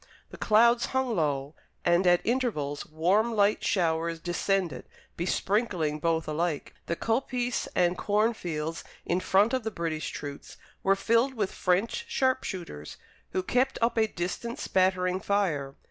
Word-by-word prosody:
The - - -9
clouds 235 +2 +4
hung 260 -3 0
low, 145 -3 -1 0.3
and 175 +1 +3
at 175 0 +4
intervals 215 - -1
warm 195 +9 +1
light 205 0 +3
showers 165 -2 0
descended 180 +1 -1 0.3
besprinkling 180 -3 0
both 165 0 0
alike. 155 0 -2
The 170 - 0
coppice 245 +3 -1
and 175 0 +3
corn 210 +5 +1
fields 165 -5 -4 0.2
in 175 - +1
front 200 +5 +3
of 260 -2 0
the 220 - -1
British 165 -6 -3
troops 145 -1 -8 0.2
were 195 0 +3
filled 230 +6 +2
with 205 -4 -1
French 195 - 0
sharp 260 - +1
shooters, 165 - -6 0.4
who 185 - 0
kept 255 +7 +1
up 230 +1 +1
a 220 -1 +3
distant 215 +6 -4
spattering 185 -1 +1
fire. 165 -10 0
185 Hz, 145 wpm, -28 LUFS, 165-225 Hz, 0.4 s, clouds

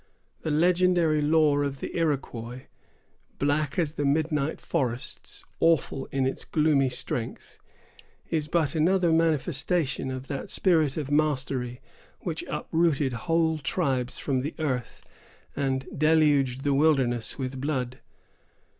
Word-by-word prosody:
The - - -3
legendary 170 -1 +3
lore 150 -1 +3
of 140 -1 -3
the - - -6
Iroquois, 130 -6 -2 0.8
black 145 0 0
as 165 -5 +1
the 145 - -3
midnight 150 +1 0
forests, 125 -7 -4
awful 165 -4 +2
in 135 -1 -1
its 130 - -2
gloomy 150 -4 +2
strength, 125 -2 -5 0.7
is 155 -2 0
but 160 -2 +1
another 170 +2 +3
manifestation 160 -2 +1
of 130 0 -5
that 140 0 -5
spirit 160 -7 +2
of 145 -2 -3
mastery 135 -5 0 0.4
which - - -4
uprooted 155 -5 +1
whole 160 +4 +1
tribes 135 -5 -1
from 135 -3 -1
the 140 +5 -4
earth, 130 -6 -3 0.5
and 135 -1 -1
deluged 145 -4 +3
the 145 -1 +2
wilderness 135 -6 +2
with 130 -1 -4
blood. 130 -3 -2
145 Hz, 120 wpm, -27 LUFS, 130-160 Hz, 0.8 s, legendary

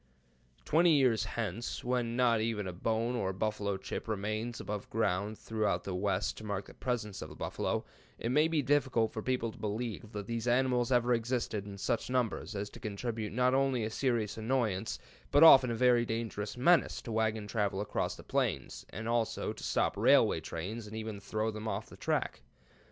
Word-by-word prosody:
Twenty 170 +3 +4
years 125 -6 +3
hence, 115 0 -4
when 120 -1 0
not 120 -3 +3
even 110 -2 -1
a 90 - -4
bone 115 +6 -1
or 100 -6 -1
a - - -2
buffalo 105 -1 -1
chip 95 - -6
remains 110 +2 -2
above 105 -1 -5
ground 105 -1 0
throughout 105 -6 -1
the 95 - -4
West 95 +1 0
to - - -9
mark 100 -2 -3
the - - -13
presence 115 -6 -3
of - - -6
the - - -11
buffalo, - - -2 0.3
it 115 - -3
may 150 +4 +4
be 160 -3 +1
difficult 130 -5 +2
for 110 - -3
people 125 -1 -1
to - - -15
believe 110 0 -4
that 105 -2 -5
these 115 +2 -3
animals 125 0 +2
ever 125 0 +3
existed 115 -3 -1
in 100 -1 -8
such 115 +5 -1
numbers 125 -3 -1
as 100 0 -2
to - - -11
constitute 110 +1 -4
not 125 +3 +2
only 135 -3 +2
a 110 - -2
serious 115 -5 0
annoyance, 110 -5 0 0.3
but 145 - +4
very 165 - +12
often 130 -2 +6
a 120 +1 +4
dangerous 115 -2 -3
menace 170 +7 +4
to 115 - -6
wagon 110 -1 0
travel 105 -2 -1
across 105 - -2
the - - -12
plains, - - -1
and 110 +5 -6
also 115 -1 0
to - - -11
stop - - +1
railway - - +5
trains, 105 +7 -5
and 105 - -8
even 110 -2 -5
throw 110 +2 -2
them 110 +1 -6
off - - -2
the - - -13
track. - - -1
110 Hz, 195 wpm, -32 LUFS, 105-125 Hz, 0.3 s, very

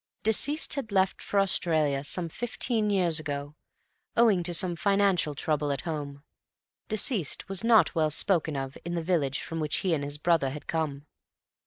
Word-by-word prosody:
Deceased 285 +8 +2
had 260 -7 -5
left 190 -1 +1
for 200 - 0
Australia 155 -7 +1
some 170 +4 -3
fifteen 225 +2 -2
years 175 -5 +2
ago, 145 -1 -5 0.6
owing 220 -6 +4
to 175 +1 -3
some 175 +1 +2
financial 195 -5 +1
trouble 150 -1 -1
at 140 - -2
home. 145 -3 -6 0.6
Deceased 215 - +2
was 195 +1 -2
not 230 -2 +4
well 160 -3 +1
spoken 160 -1 +1
of 135 0 -4
in 175 +1 -4
the 170 - -2
village 155 -6 0
from 165 -1 -5
which 150 -1 -1
he 180 - +2
and 145 -3 -1
his 145 +1 -4
brother 160 -3 +1
had 145 +2 -8
come. 150 -3 -3
165 Hz, 170 wpm, -27 LUFS, 150-195 Hz, 0.6 s, owing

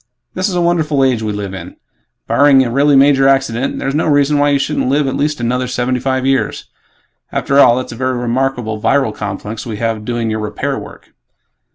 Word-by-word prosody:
This 185 +2 -1
is 185 - -3
a 175 - +1
wonderful 160 -5 +1
age 125 -4 +1
we 110 -1 -2
live 100 -2 -5
in. 95 - -9 0.5
Barring 140 -2 +4
a 120 - -3
really 140 +3 +3
major 135 0 +4
accident, 135 -2 0
there's 135 - -3
no 155 +3 0
reason 145 0 +2
why 145 0 +3
you 140 - +3
shouldn't 135 - -1
live 145 +2 +1
at 135 - -2
least 150 0 -1
another 125 +2 -1
seventy 125 +1 -1
five 130 0 -1
years. 135 0 -1 0.7
After 140 0 +1
all, 120 - +6
that's 130 - -4
a - - -7
very 130 +1 -2
remarkable 120 -2 -2
viral 135 -4 +1
complex 105 +2 -6
we 110 -3 -6
have 115 -1 -2
doing 115 -1 -2
your 110 - -2
'repair' 105 0 -3
work." - - -13
130 Hz, 205 wpm, -15 LUFS, 115-140 Hz, 0.7 s, all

